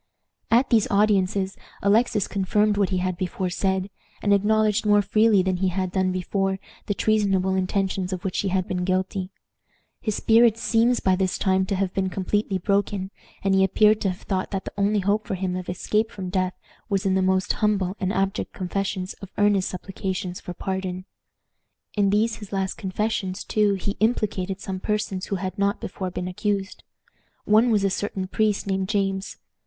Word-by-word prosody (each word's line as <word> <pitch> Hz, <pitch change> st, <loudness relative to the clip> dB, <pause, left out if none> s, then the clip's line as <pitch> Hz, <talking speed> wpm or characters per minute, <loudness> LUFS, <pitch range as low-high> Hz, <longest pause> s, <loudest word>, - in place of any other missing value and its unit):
At 245 Hz, +4 st, +3 dB
these 225 Hz, -3 st, +4 dB
audiences 195 Hz, -2 st, +2 dB, 0.3 s
Alexis 210 Hz, 0 st, +3 dB
confirmed 205 Hz, +2 st, +1 dB
what 200 Hz, -2 st, +2 dB
he 185 Hz, -, 0 dB
had 185 Hz, 0 st, -1 dB
before 185 Hz, 0 st, -2 dB
said, 190 Hz, +1 st, -1 dB, 0.3 s
and 205 Hz, -, +4 dB
acknowledged 210 Hz, +1 st, +2 dB
more 205 Hz, -1 st, +4 dB
freely 215 Hz, -2 st, +4 dB
than 185 Hz, -1 st, 0 dB
he 190 Hz, +1 st, +1 dB
had 185 Hz, 0 st, -1 dB
done 185 Hz, -1 st, +1 dB
before 190 Hz, +1 st, -1 dB, 0.3 s
the 205 Hz, -, 0 dB
treasonable 195 Hz, -4 st, +2 dB
intentions 190 Hz, 0 st, -1 dB
of 185 Hz, -2 st, -4 dB
which 190 Hz, -, -1 dB
he 200 Hz, -, 0 dB
had 185 Hz, -1 st, 0 dB
been 180 Hz, -1 st, -2 dB
guilty. 185 Hz, 0 st, -1 dB, 0.7 s
His 215 Hz, -2 st, -1 dB
spirit 230 Hz, 0 st, +4 dB
seems 235 Hz, +1 st, +2 dB
by 190 Hz, -1 st, +3 dB
this 185 Hz, -1 st, 0 dB
time 190 Hz, 0 st, +1 dB
to 195 Hz, -, 0 dB
have 190 Hz, -1 st, -1 dB
been 190 Hz, -1 st, 0 dB
completely 195 Hz, +2 st, -1 dB
broken, 200 Hz, 0 st, 0 dB, 0.3 s
and 195 Hz, 0 st, +2 dB
he 190 Hz, 0 st, +4 dB
appeared 210 Hz, +3 st, +4 dB
to 195 Hz, -, +1 dB
have 185 Hz, -, -6 dB
thought 190 Hz, -2 st, -2 dB
that 195 Hz, -1 st, -3 dB
the -, -, -6 dB
only 205 Hz, +1 st, +1 dB
hope 205 Hz, +3 st, 0 dB
for 200 Hz, -, -1 dB
him 185 Hz, -1 st, -2 dB
of 185 Hz, -1 st, -5 dB
escape 210 Hz, +5 st, 0 dB
from 190 Hz, -5 st, -6 dB
death 185 Hz, -1 st, 0 dB, 0.3 s
was 200 Hz, -1 st, 0 dB
in 190 Hz, -, +2 dB
the 190 Hz, -, +2 dB
most 185 Hz, 0 st, +2 dB
humble 200 Hz, -3 st, +1 dB
and 190 Hz, -2 st, 0 dB
abject 195 Hz, -1 st, -1 dB
confessions 190 Hz, 0 st, -3 dB
and 195 Hz, -, -8 dB
earnest 205 Hz, -2 st, +3 dB
supplications 185 Hz, -1 st, -4 dB
for 180 Hz, -, -7 dB
pardon. 185 Hz, 0 st, -4 dB, 0.9 s
In 200 Hz, -2 st, +3 dB
these 220 Hz, +3 st, +1 dB
his 210 Hz, -3 st, -10 dB
last 195 Hz, -1 st, -1 dB
confessions, 190 Hz, -1 st, -2 dB
too, 210 Hz, -2 st, +2 dB
he 195 Hz, +1 st, -2 dB
implicated 200 Hz, -4 st, 0 dB
some 190 Hz, -1 st, -4 dB
persons 205 Hz, -2 st, -2 dB
who 200 Hz, -, -1 dB
had 185 Hz, +1 st, -4 dB
not 200 Hz, 0 st, +1 dB
before 185 Hz, -1 st, -4 dB
been 180 Hz, 0 st, -4 dB
accused. 200 Hz, +1 st, -2 dB, 0.6 s
One 220 Hz, +3 st, +5 dB
was 210 Hz, -3 st, +2 dB
a 195 Hz, -, +2 dB
certain 195 Hz, -1 st, -2 dB
priest 210 Hz, +1 st, 0 dB
named 190 Hz, -1 st, -1 dB
James. 195 Hz, -2 st, -1 dB
195 Hz, 185 wpm, -24 LUFS, 185-205 Hz, 0.9 s, One